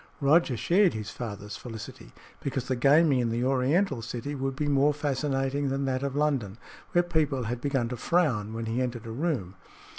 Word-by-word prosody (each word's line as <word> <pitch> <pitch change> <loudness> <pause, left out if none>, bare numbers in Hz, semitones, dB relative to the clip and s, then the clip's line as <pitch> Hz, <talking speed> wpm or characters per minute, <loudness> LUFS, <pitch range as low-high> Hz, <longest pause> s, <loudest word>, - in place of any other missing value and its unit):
Roger 145 -2 +3
shared 180 - +3
his 110 +1 -5
father's 105 -3 -6
felicity, 115 -3 -9 0.3
because 135 -2 -3
the 130 - 0
gaming 140 +2 +4
in 120 -2 +1
the 115 +2 -1
oriental 135 +2 +1
city 120 +5 -5
would 135 -1 -2
be 145 +2 -1
more 145 +1 +3
fascinating 140 -1 -1
than 135 +1 -1
that 130 -1 -1
of 140 -1 -2
London, 135 -9 0 0.4
where 175 - +4
people 155 -6 0
had 120 +2 -3
begun 135 -4 0
to 125 - -4
frown 120 - +1
when 115 0 -4
he 115 +3 -1
entered 120 -2 -3
a 115 - -6
room. 125 - -2
135 Hz, 185 wpm, -28 LUFS, 120-145 Hz, 0.4 s, gaming